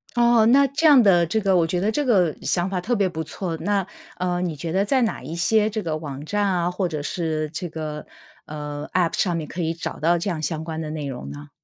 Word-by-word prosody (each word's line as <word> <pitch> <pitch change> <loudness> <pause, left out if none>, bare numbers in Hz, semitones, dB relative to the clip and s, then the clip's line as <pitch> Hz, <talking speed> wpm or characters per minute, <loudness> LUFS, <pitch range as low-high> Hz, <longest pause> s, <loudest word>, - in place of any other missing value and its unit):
哦， 235 -1 +5
那 275 +4 +6
这 300 +5 +2
样 285 -4 +8
的 175 -4 +5
这 220 +7 0
个 195 -3 +2
我 170 -2 +3
觉 175 +2 -1
得 205 +4 +1
这 295 +6 0
个 190 - +3
想 175 0 0
法 185 -2 -2
特 235 +7 0
别 200 -3 +2
不 160 -3 -4
错。 170 +2 -4
那， 200 +1 0 0.3
呃， 180 -1 -1
你 175 -3 -2
觉 160 +3 -5
得 190 +3 +2
在 255 +5 +2
哪 225 - -2
一 165 - -6
些 215 +5 +2
这 215 0 -3
个 160 -2 -2
网 145 -3 -7
站 205 +4 0
啊， 175 -2 0
或 185 0 -1
者 155 -4 -4
是 155 -1 -2
这 175 +2 -4
个， 155 -1 -6 0.4
呃 150 0 -6
，App 175 -2 +2
上 175 -4 0
面 155 -2 -4
可 175 - -5
以 165 0 0
找 170 - -6
到 170 +2 +3
这 170 +4 -2
样 160 -3 -4
相 155 +1 -2
关 160 -1 -5
的 155 - -5
内 155 -1 -4
容 125 - -6
呢？ 70 +1 -9
175 Hz, 285 characters per minute, -23 LUFS, 155-205 Hz, 0.4 s, 样